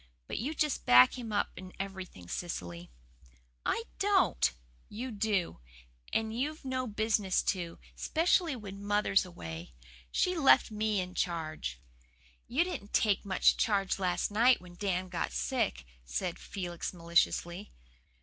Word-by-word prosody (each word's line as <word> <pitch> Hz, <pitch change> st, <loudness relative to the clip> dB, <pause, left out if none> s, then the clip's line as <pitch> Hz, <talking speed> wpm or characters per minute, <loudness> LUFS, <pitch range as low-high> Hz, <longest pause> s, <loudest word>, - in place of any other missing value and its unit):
But -, -, -3 dB
you 285 Hz, +8 st, -2 dB
just 300 Hz, -2 st, 0 dB
back 125 Hz, +1 st, +8 dB
him 235 Hz, -4 st, -6 dB
up 205 Hz, -, 0 dB
in 185 Hz, 0 st, -9 dB
everything, 190 Hz, -, -6 dB
Cecily." 90 Hz, -, -5 dB, 0.7 s
"I 455 Hz, -, 0 dB, 0.2 s
don't!" 390 Hz, -, +3 dB, 0.4 s
"You 245 Hz, +5 st, -5 dB
do! 205 Hz, -, 0 dB, 0.5 s
And 220 Hz, 0 st, 0 dB
you've 295 Hz, +4 st, -3 dB
no 255 Hz, -1 st, -1 dB
business 210 Hz, -3 st, +1 dB
to, 175 Hz, -3 st, -6 dB, 0.2 s
specially 330 Hz, -1 st, +2 dB
when 200 Hz, -3 st, -8 dB
mother's 205 Hz, -2 st, +2 dB
away. 80 Hz, -, -8 dB, 0.4 s
She 365 Hz, 0 st, +2 dB
left 275 Hz, -6 st, +5 dB
ME 215 Hz, -1 st, 0 dB
in 180 Hz, 0 st, -6 dB
charge." 160 Hz, -, -2 dB, 0.7 s
"You 280 Hz, +8 st, +2 dB
didn't 280 Hz, -, -6 dB
take 205 Hz, -3 st, +2 dB
much 190 Hz, -2 st, +4 dB
charge 195 Hz, -3 st, +1 dB
last 180 Hz, +1 st, 0 dB
night 235 Hz, +4 st, +5 dB
when 180 Hz, -1 st, -13 dB
Dan 185 Hz, 0 st, -1 dB
got 180 Hz, -, -3 dB
sick," 60 Hz, 0 st, -1 dB, 0.2 s
said 170 Hz, -, -3 dB
Felix 175 Hz, -3 st, -5 dB
maliciously. 170 Hz, +2 st, +1 dB
195 Hz, 135 wpm, -31 LUFS, 175-225 Hz, 0.7 s, back